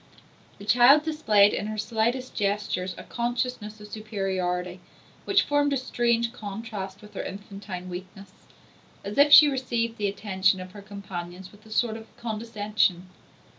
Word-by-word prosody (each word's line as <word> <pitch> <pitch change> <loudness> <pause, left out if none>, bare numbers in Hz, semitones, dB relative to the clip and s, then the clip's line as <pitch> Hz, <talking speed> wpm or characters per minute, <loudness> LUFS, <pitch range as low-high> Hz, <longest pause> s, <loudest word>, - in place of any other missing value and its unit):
The 200 - -11
child 245 +7 +6
displayed 215 -11 +4
in 205 - -2
her 215 0 -4
slightest 230 +4 -1
gestures 200 -3 -1
a - - -8
consciousness 235 -3 -3
of 210 - -10
superiority 190 -4 -3 0.5
which 395 0 +4
formed 290 0 +1
a - - +2
strange 235 -2 0
contrast 205 -3 -7
with 210 - -14
her - - -4
infantine 195 -2 -7
weakness; 185 +1 -9 0.7
as 205 +6 -4
if 290 +1 +6
she 300 +1 +11
received 235 -4 -2
the 205 - +1
attentions 190 -2 +1
of 185 0 -8
her 205 - -11
companions 185 -3 -8
with 205 +1 -19
a - - -15
sort 220 0 0
of 220 - -12
condescension. 210 -5 -1
210 Hz, 150 wpm, -26 LUFS, 195-235 Hz, 0.7 s, she